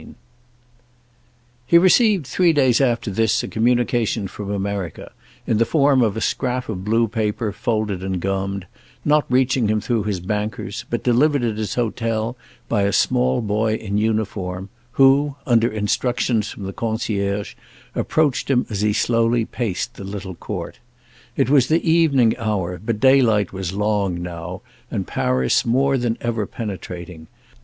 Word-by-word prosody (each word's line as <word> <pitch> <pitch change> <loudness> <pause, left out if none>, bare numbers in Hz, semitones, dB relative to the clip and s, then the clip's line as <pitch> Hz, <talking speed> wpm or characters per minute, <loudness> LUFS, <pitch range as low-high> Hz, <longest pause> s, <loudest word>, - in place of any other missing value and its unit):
II - - -14 1.5
He 170 - +6
received 190 - +4
three 175 +4 +2
days 130 -4 +3
after 120 -4 +1
this 110 +2 +1
a - - -4
communication 120 -2 +1
from 100 +1 -7
America, 100 -4 -4 0.3
in 110 - +1
the - - +5
form 140 0 +3
of 110 -3 +1
a - - -2
scrap 125 -1 -1
of 95 -4 -4
blue 115 +3 +2
paper 110 0 -2
folded 105 -2 -2
and 95 -1 -2
gummed, 95 +1 -2 0.4
not 150 0 +3
reaching 130 -2 +2
him 110 +1 +1
through 110 0 -1
his 100 -4 -1
bankers, 105 +3 -4
but 120 -2 -2
delivered 135 +3 +3
at 110 -3 -1
his 105 -3 -3
hotel 115 -1 -1 0.3
by 110 -3 +1
a 100 0 +2
small 65 -7 +2
boy 110 +1 0
in 105 -2 -2
uniform, 100 -4 -2 0.2
who, 135 +2 +4
under 120 -1 +3
instructions 110 +1 0
from 100 - -8
the 95 0 -5
concierge, 105 -3 -2 0.4
approached 150 -5 0
him 125 -2 +2
as 100 -1 -2
he 105 0 +2
slowly 115 +1 +2
paced 115 0 -3
the - - -10
little 95 -1 -6
court. 85 - -6 0.6
It - - +2
was 135 -2 +4
the 165 +2 +1
evening 150 -8 +4
hour, 95 -6 -2
but 110 -1 -2
daylight 115 -7 +4
was 95 -1 -4
long 100 -3 0
now 85 -2 -6 0.3
and - - -3
Paris 65 0 +1
more 135 +4 +2
than 120 -3 -1
ever 115 -4 -2
penetrating. 90 -6 -7
110 Hz, 155 wpm, -21 LUFS, 100-125 Hz, 1.5 s, He